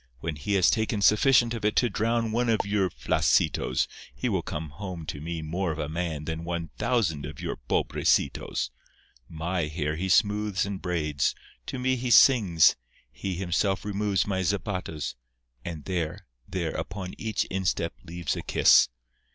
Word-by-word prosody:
When 80 +3 -3
he 75 +8 -3
has 95 -2 +5
taken 110 -2 0
sufficient 120 +2 +5
of 115 - -5
it 105 0 +1
to 125 - +4
drown 115 +1 0
one 120 +2 +1
of 110 - +3
your 100 -2 +1
flaccitos - - +1 0.3
he - - -1
will - - 0
come 75 0 -5
home 90 0 -7
to 75 - -5
me 80 0 -4
more 85 +3 -1
of 75 - -5
a 75 -2 -2
man 80 -2 -3
than 80 +1 -4
one 85 -2 -4
thousand 105 - +1
of 70 0 -7
your - - -4
pobrecitos. - - +1 0.6
My 85 +1 -2
hair 75 0 -2
he 95 +3 -2
smooths 105 +1 +2
and 100 -2 -5
braids; 75 -5 0 0.3
to - - -4
me 130 +1 +1
he 125 +1 -3
sings; 100 - +6 0.4
he 95 +8 -4
himself 95 +2 0
removes 100 -2 0
my 95 -2 -1
zapatos, 90 -5 -2 0.5
and 80 -4 -6
there, 90 +1 -3 0.2
there, 85 -4 -2
upon 95 -1 -5
each 110 -2 -1
instep 95 -3 -1
leaves 85 -2 -3
a - - -4
kiss. - - +5
90 Hz, 165 wpm, -27 LUFS, 80-105 Hz, 0.6 s, sings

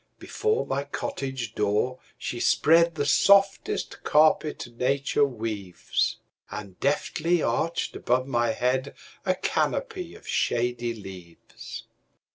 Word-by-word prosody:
Before 440 0 -1
my 140 +1 -2
cottage 135 -4 -4
door 105 +5 0 0.2
she 120 - -4
spreadThe 165 +2 +4
softest 200 +5 +3
carpet 155 0 +3
nature 135 +3 +1
weaves, 110 -8 -2 0.3
And 100 -3 -8
deftly 160 +4 +1
arched 165 +1 -1
above 130 +1 +1
my 120 -3 +1
headA 130 +4 0 0.5
canopy 445 -8 -1
of - - -15
shady 120 0 0
leaves. 95 -5 -10
130 Hz, 95 wpm, -26 LUFS, 115-155 Hz, 0.5 s, spreadThe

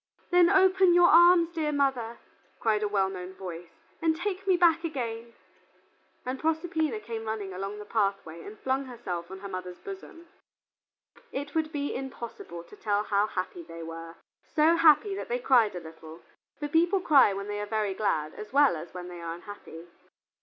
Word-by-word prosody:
"Then 355 -1 +6
open 380 -2 +5
your 350 0 +6
arms, 345 0 +6
mother 275 -7 0
dear," - - -27 0.4
cried 215 -2 +1
a 210 - +1
well 200 -2 +1
known 185 0 -7
voice, 175 -3 -8 0.3
"and 320 -1 +2
take 390 +2 -4
me 370 -2 +4
back 335 -1 +4
again." 235 -7 -4 0.9
And 255 +1 -3
Proserpina 320 -5 -1
came 225 +1 -6
running 210 -3 -4
along 195 +3 -5
the 210 - -8
pathway 195 -6 -1
and 215 - -10
flung 265 +1 0
herself 185 -9 -6
on 190 0 -9
her 200 - -6
mother's 185 -2 -6
bosom. 380 -3 -10 1.0
It 285 +1 -5
would 315 -1 0
be 285 -2 -2
impossible 235 -9 -7
to - - -15
tell 205 -1 0
how 205 0 +1
happy 185 -3 -4
they 165 0 -9
were; 165 0 -8 0.4
so 320 +2 +5
happy 335 +5 +5
that 390 - -6
they 240 - 0
cried 240 -5 +3
a - - -3
little, 160 0 -12 0.3
for 295 - -3
people 340 +6 +3
cry 290 - +5
when 200 0 -5
they 205 0 -3
are 210 - -4
very 210 -2 -1
glad 155 -7 -1
as 210 - -9
well 280 -5 +5
as 165 +3 -9
when 180 -1 -6
they 175 -1 -9
are 165 0 -4
unhappy. 175 -3 -11
225 Hz, 180 wpm, -28 LUFS, 190-315 Hz, 1.0 s, Then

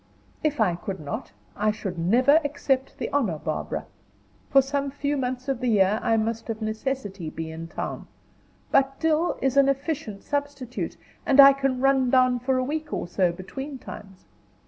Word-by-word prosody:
"If 300 -3 0
I 210 -6 +3
could 190 +2 -5
not, 145 -9 -6 0.2
I 215 +1 +1
should 200 -4 -4
never 255 - +4
accept 280 -2 -1
the - - -3
honor, 225 - +1
Barbara. 155 0 -3 0.6
For 275 - +6
some 280 +1 -1
few 285 +1 -2
months 255 -1 -3
of 270 -3 -1
the 250 - -2
year 210 -1 +3
I 225 -1 +2
must 225 +1 -2
of 220 -1 -3
necessity 215 - -3
be 160 0 -6
in 165 +1 -7
town; - - -5 0.6
but 270 0 +2
Dill 320 +1 +1
is 270 0 +1
an 275 0 +6
efficient 275 -7 -3
substitute, 285 -4 -3 0.3
and 280 0 +2
I 275 0 +11
can 270 -2 -1
run 270 -2 +3
down 255 -1 +4
for 260 +2 0
a 255 - +1
week 305 +3 -3
or - - -3
so 180 0 +1
between 265 +11 -7
times. 195 -5 -11
255 Hz, 175 wpm, -25 LUFS, 210-275 Hz, 0.6 s, I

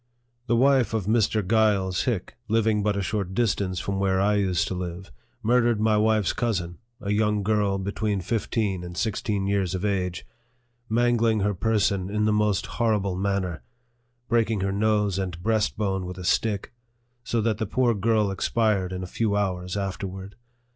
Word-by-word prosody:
The 120 - +2
wife 130 -2 +3
of 105 -5 -1
Mr. 110 -2 +1
Giles 105 -4 +2
Hick, 110 -8 -2
living 110 -1 +2
but 105 -1 0
a 100 - -1
short 95 -2 -3
dis 120 -4 +3
tance 95 -3 -3
from 100 -1 -3
where 95 -1 +1
I 100 +2 +3
used 90 -4 +1
to - - -2
live, 90 +1 -6 0.3
murdered 120 -1 +3
my 110 0 +3
wife's 110 -2 +2
cousin, 90 -8 -2 0.2
a 100 -2 -3
young 105 -1 +1
girl 105 -1 +1
between 100 +1 -2
fifteen 100 -1 -1
and 90 0 -8
sixteen 105 -2 -1
years 100 -2 0
of 95 +2 -3
age, 90 -3 -1 0.6
mangling 115 -1 +2
her 105 +1 +1
person 100 -2 0
in 105 +1 0
the 110 - +2
most 105 -2 +1
horrible 105 -5 0
man 100 +1 0
ner, 85 -6 -5 0.7
breaking 115 -4 +1
her 95 0 0
nose 105 -1 +1
and 90 -3 -4
breastbone 105 -4 0
with 90 0 -7
a 90 - -7
stick, 105 +3 0 0.5
so 120 -1 -1
that 110 -1 0
the 110 - -1
poor 125 +2 +2
girl 105 -1 +1
expired 100 -2 0
in 90 0 -4
a - - -3
few 105 +3 -1
hours 90 -2 -1
afterward. 95 0 -5
105 Hz, 175 wpm, -25 LUFS, 95-110 Hz, 0.7 s, wife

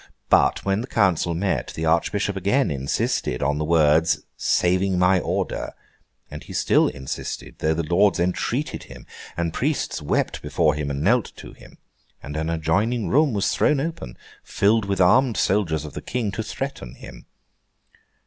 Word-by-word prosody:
But - - +3
when 100 +2 +1
the 125 - -6
council 90 -8 +1
met, 95 +3 -2
the 80 - -3
Archbishop 95 +5 +1
again 100 - +1
insisted 70 -2 -1
on 75 +2 0
the - - -1
words 80 0 +3
'saying 95 +1 +1
my 90 +1 +4
order;' - - -3 0.6
and - - -8
he - - -10
still - - +3
insisted, 65 -2 -6
though 80 +1 +1
lords 85 +5 +2
entreated 115 - -2
him, - - -12 0.3
and 85 -1 -1
priests 145 +3 -1
wept - - -1
before 80 -3 +1
him 75 -1 -3
and 70 +1 -3
knelt 120 +4 +2
to - - -11
him, - - -17 0.5
and 70 +1 -7
an 80 +1 -2
adjoining 100 +9 0
room 150 +2 +3
was 100 -2 0
thrown 150 -2 +2
open, 140 - -5 0.3
filled 105 +2 +1
with 100 -1 -2
armed 115 +6 +4
soldiers 85 -6 +1
of 75 - -9
the - - -6
King, 120 -5 -2
to 110 - -4
threaten 110 - -6
him. - - -12
90 Hz, 160 wpm, -23 LUFS, 80-105 Hz, 0.6 s, my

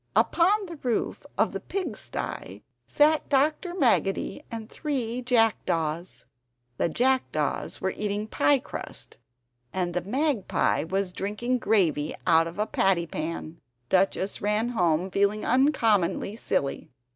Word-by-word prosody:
Upon 395 +4 +3
the 340 -3 -8
roof 245 -5 -2
of - - +2
the - - -4
pig 390 -2 -4
stye - - -5 0.2
sat 300 +1 +3
Dr. 305 +6 +1
Maggotty 240 - +1
and 225 -2 -6
three 250 -4 -3
jackdaws. 185 -9 0 0.5
The - - +1
jackdaws 245 - 0
were 190 - 0
eating 210 0 -2
piecrust, 280 +4 -1 0.5
and 180 -2 -2
the 180 - 0
magpie 245 - 0
was 190 +1 -1
drinking 235 +7 -1
gravy 165 -10 +1
out 165 -1 +4
of 165 - -8
a 210 - +1
patty 190 -5 +2
pan. 160 0 -5 0.3
Duchess 190 +1 +1
ran 210 +3 +1
home 180 -5 +1
feeling 200 +2 +1
uncommonly 225 - +2
silly! 140 -10 -2
210 Hz, 120 wpm, -26 LUFS, 180-260 Hz, 0.5 s, out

